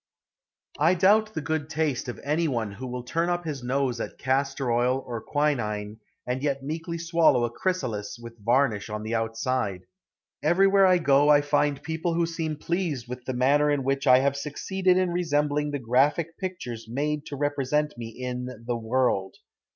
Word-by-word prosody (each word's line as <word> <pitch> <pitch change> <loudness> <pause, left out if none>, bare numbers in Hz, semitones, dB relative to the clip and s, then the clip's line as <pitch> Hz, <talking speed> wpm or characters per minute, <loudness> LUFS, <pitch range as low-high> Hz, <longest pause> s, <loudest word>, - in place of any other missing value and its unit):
I 165 +5 +4
doubt 215 +4 +3
the 160 - -1
good 155 -1 -2
taste 155 -5 -1
of 125 - -5
any 155 +4 +1
one 115 -7 -2
who 120 +6 -7
will 125 0 -5
turn 165 +7 -1
up 175 0 -1
his 145 -4 -4
nose 125 -1 -1
at - - -6
castor 135 -1 0
oil 125 +3 +1
or 120 -2 -5
quinine 110 -7 -1 0.3
and 125 +1 -2
yet 140 -2 -1
meekly 165 +4 -4
swallow 165 -6 +3
a 120 - -4
chrysalis 120 - -2
with 115 -2 -12
varnish 120 -3 +2
on 105 0 -4
the 110 +1 -4
outside. 115 -3 -1 0.6
Everywhere 195 +2 +4
I 185 -1 +5
go 145 -3 +4
I 145 -1 +7
find 145 -1 0
people 160 +2 -2
who 170 0 +2
seem 165 -2 -3
pleased 160 -6 -2
with 125 0 -7
the 130 - -3
manner 145 +4 +3
in 145 -2 +1
which 135 +1 -1
I 125 0 +8
have 140 0 +1
succeeded 180 +6 0
in 185 -1 +1
resembling 150 -3 0
the 145 - -2
graphic 140 +7 +1
pictures 150 - -5
made 150 +4 -2
to 145 - -5
represent 145 +1 0
me 115 -1 -6
in 125 +1 -5 0.2
The 120 0 -1
World. 115 -4 0
140 Hz, 180 wpm, -26 LUFS, 125-160 Hz, 0.6 s, I